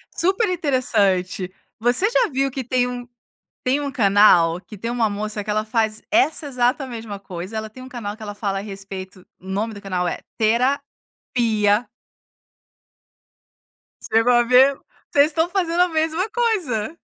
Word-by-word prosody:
Super 380 +5 +1
interessante. 210 - 0 0.3
Você 245 - +3
já - - +2
viu 270 +1 +1
que 265 0 -4
tem 250 +1 +1
um 245 -1 -6 0.6
tem 265 +3 +2
um 280 -1 -3
canal, 200 -7 +5
que 210 - -12
tem 230 +4 -3
uma 235 -3 +1
moça 210 0 -4
que 210 - -4
ela 215 +1 +1
faz 220 -1 0
essa 320 -2 +2
exata 255 +1 0
mesma 225 -5 -7
coisa, 185 +1 -7
ela 220 0 -3
tem 255 +4 -12
um 255 - -9
canal 225 -5 -6
que 220 - -14
ela 205 -1 -6
fala 200 -2 -2
a - - -7
respeito, 195 -2 -9
o 185 - -17
nome 210 +4 -2
do 205 - -9
canal 180 -3 -1
é - - -4 0.9
Tera-pia. 220 -2 +1 2.2
Você - - -6
chegou 245 +2 +4
a 240 - +5
ver? 260 +3 +5 0.3
Vocês 285 +1 +5
estão 325 +2 +1
fazendo 355 -3 +1
a 360 - +5
mesma 320 +5 0
coisa. 350 - -1
235 Hz, 165 wpm, -22 LUFS, 205-280 Hz, 2.2 s, canal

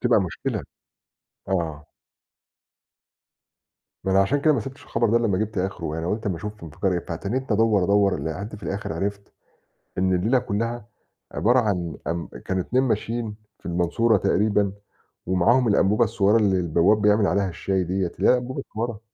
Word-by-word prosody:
بتبقى 120 -4 +4
مشكلة. 105 +4 -3 0.9
آه. 80 -6 -2 2.2
ما 95 - 0
أنا 95 - +5
عشان 135 +9 +2
كده 155 +2 +4
ما 135 - 0
سِبتش 135 +6 -9
الخبر 115 0 0
ده 115 - +4
إلّا 120 0 +2
أمّا 95 -4 +1
جبت 110 0 -2
أخره 90 -4 -3
يعني 80 +1 -3
قُلت 110 +5 -2
أما 95 -4 -1
اشوفهم 105 -3 -7
في 75 - -17
قرية، 95 -2 +1
فتنِّيتني 100 +8 -3
أدوّر 110 -4 +3
أدوّر 100 0 +2
لحد 100 +7 -5
في 105 - -16
الآخر 100 -3 -3
عرفت 100 +4 -4 0.7
إن 95 0 +2
الليلة 110 +9 +2
كلّها 115 -1 -3 0.5
عبارة 120 +4 +3
عن 90 -7 -2
أم 85 0 -2
كانوا 95 -1 -3
اتنين 125 +7 +1
ماشيين 115 -2 -1 0.2
في - - -15
المنصورة 90 +7 +2
تقريبًا، 100 0 +1 0.5
ومعاهم 115 +8 +3
الأنبوبة 105 +2 +3
الصغيّرة 100 0 +2
اللي 100 -4 +3
البواب 85 +5 +3
بيعمل 105 0 +4
عليها 100 -1 +1
الشاي 95 +2 -1
دِيّة، 90 0 -1
اللي - - +3
هي - - +8
الأنبوبة 125 +2 -2
الصغيرة 110 -1 -4
100 Hz, 165 wpm, -24 LUFS, 90-115 Hz, 2.2 s, هي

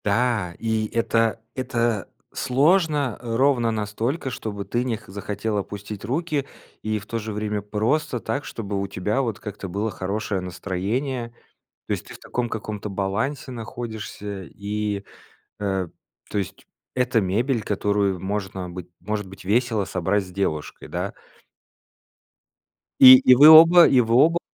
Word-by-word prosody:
Да, 105 -4 +1
и 110 -1 -1
это 115 -1 +1
это 120 -5 -1 0.2
сложно, 145 - +2
э, 115 -2 -3
ровно 125 -2 +3
настолько, 110 +7 -2
чтобы 100 -5 -5
ты 120 +1 -1
не 120 -3 -2
х 105 - -16
захотел 105 +2 -3
опустить 100 +1 -6
руки, 145 +3 -1 0.3
и 110 0 -1
в 105 - -8
то 115 +1 -3
же 110 0 -5
время 105 0 -2
просто 110 +6 -1
так, 115 +6 -3
чтобы 100 -3 -4
у 100 - -3
тебя 105 +8 -1
вот 115 -6 -3
как-то 105 -2 -7
было 105 +4 -2
хорошее 100 +1 -3
настроение. 110 +8 -3 0.5
То - - -5
есть - - -4
ты - - -11
в - - -12
таком 125 -1 -3
каком-то 110 -1 -5
балансе 100 +9 -2
находишься, 110 -4 -6
и, 105 +1 -4 0.6
э, 95 -3 -1 0.4
то - - -3
есть 100 -3 -4 0.3
это 125 -3 +1
мебель, 115 +6 0
которую 100 -2 0
можно 95 -1 -4
быть 90 0 -8
может 105 -2 -3
быть, 95 0 -13
весело 110 0 +1
собрать 95 +2 0
с 90 - -12
девушкой, 90 -5 -3
да. - - -3 1.9
И 130 -1 +12
и 130 -1 +6
вы 145 +5 +9
оба 165 +2 +9
и 130 - +5
вы 115 0 +1
оба 160 +6 +5
110 Hz, 150 wpm, -23 LUFS, 100-125 Hz, 1.9 s, И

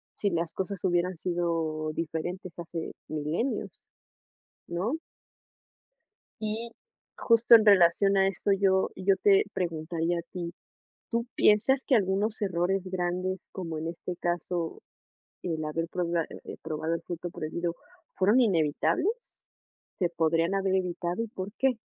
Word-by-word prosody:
si 200 -2 0
las 165 -1 -1
cosas 190 0 -3
hubieran 180 0 +1
sido 165 -3 -1
diferentes 165 +3 -4
hace 170 -1 -5 0.2
milenios, 155 - -3 0.8
¿no? 180 +8 -1 1.5
Y, 220 +2 -3 0.5
justo 230 0 +5
en 220 -2 +8
relación 195 0 +5
a 190 - +5
eso, 195 +1 -1
yo 190 -1 +3
yo 190 +1 +2
te 195 0 +5
preguntaría 170 0 -1
a - - -4
ti, 170 -2 -4 0.6
¿tú 235 0 0
piensas 265 +6 +4
que 265 - +3
algunos 205 +1 +1
errores 185 0 0
grandes 185 +1 -1
como, 165 -4 -4
en 160 - -3
este 170 +1 -5
caso, 175 -1 -2 0.6
el 160 -3 -2
haber 165 +2 -2
proba 170 -1 0
eh - - -9
eh, - - -7
probado 160 +1 -2
el 170 - -4
fruto 175 0 -5
prohibido 170 +2 -3 0.4
fueron 205 +7 +4
inevitables? 195 - 0 0.5
¿Se 180 - +2
podrían 165 +2 +1
haber 195 -1 +1
evitado?, 180 +1 -1
y, - - -2
¿por 195 -1 -6
qué? 265 -2 +2
180 Hz, 135 wpm, -28 LUFS, 165-195 Hz, 1.5 s, en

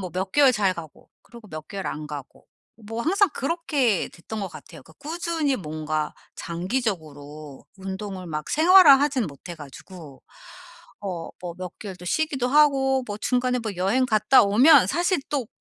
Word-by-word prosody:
뭐 185 -2 -6
몇 190 +1 -3
개월 285 -2 +6
잘 200 -5 +1
가고 160 -3 -11
그리고 235 -2 -15
몇 155 -1 -9
개월 195 -1 -6
안 150 0 -5
가고. 145 -3 -10 0.4
뭐 225 +2 -4
항상 390 - +3
그렇게 280 - 0
됐던 215 +6 -8
것 195 - -4
같아요. 155 -5 -13
그 - - -20
꾸준히 320 -1 -2
뭔가 155 - -4 0.2
장기적으로 160 - -5
운동을 190 -1 -6
막 150 -2 -5
생활화하진 295 - +6
못해 150 +3 -9
가지고. 150 0 -12 0.8
어 180 -5 -5
뭐 175 -1 -6
몇 180 -1 -8
개월 195 -4 -8
또 180 - -13
쉬기도 270 - -1
하고 270 -2 +3
뭐 205 - -5
중간에 250 +1 0
뭐 220 -2 -4
여행 200 +8 +1
갔다 225 +3 +4
오면 220 - +6
사실 345 - +1
또 275 -5 -1
205 Hz, 300 characters per minute, -24 LUFS, 170-270 Hz, 0.8 s, 개월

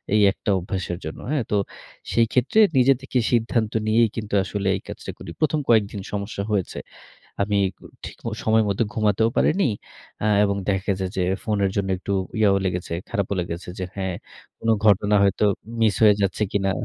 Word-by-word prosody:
এই 105 - +4
একটা 100 - -6
অভ্যাসের 90 -1 -4
জন্য। - - -6
হ্যা? 150 -4 +1
তো 105 - +3 0.5
সেই 115 - +4
ক্ষেত্রে 130 - +2 0.2
নিজেদের 130 0 +4
থেকে 135 - -2
সিদ্ধান্ত 115 -2 +1 0.2
নিয়েই 115 +1 +4
কিন্তু 105 -2 -5
আসলে 100 +1 -3
এই 95 - -5
কাজটা - - -7
করি, - - -10
১ম 155 0 +2
কয়েকদিন 105 -3 +2
সমস্যা 100 0 -3
হয়েছে। 100 -4 -1 0.6
আমি 100 0 +1 0.3
উ - - -14 0.2
ঠিক - - -9 0.3
সময়মতো 110 -1 +2
ঘুমাতেও 110 +1 +2
পারিনি। 180 -4 +3 0.5
আ - - +1 0.2
এবং 100 -1 +1
দেখা 95 +1 0
যায় 95 -1 -2
যে 90 - +2 0.2
ফোনের 100 -3 +1
জন্য 100 -2 -1
একটুও 100 +1 -1 0.2
ইয়াও 100 -2 +4
লেগেছে, 90 -2 -2 0.2
খারাপও 100 -3 -1
লেগেছে 85 +1 -6
যে - - -2
হ্যা, 95 -1 -2 0.5
কোনো 115 0 +2
ঘটনা 105 0 +4
হয়তো 100 +1 +2 0.4
মিস 110 -2 +3
হয়ে 105 -1 +8
যাচ্ছে 100 +2 0
কিনা 95 -1 +1
হ্যা। - - -4
105 Hz, 175 wpm, -23 LUFS, 100-110 Hz, 0.6 s, হয়ে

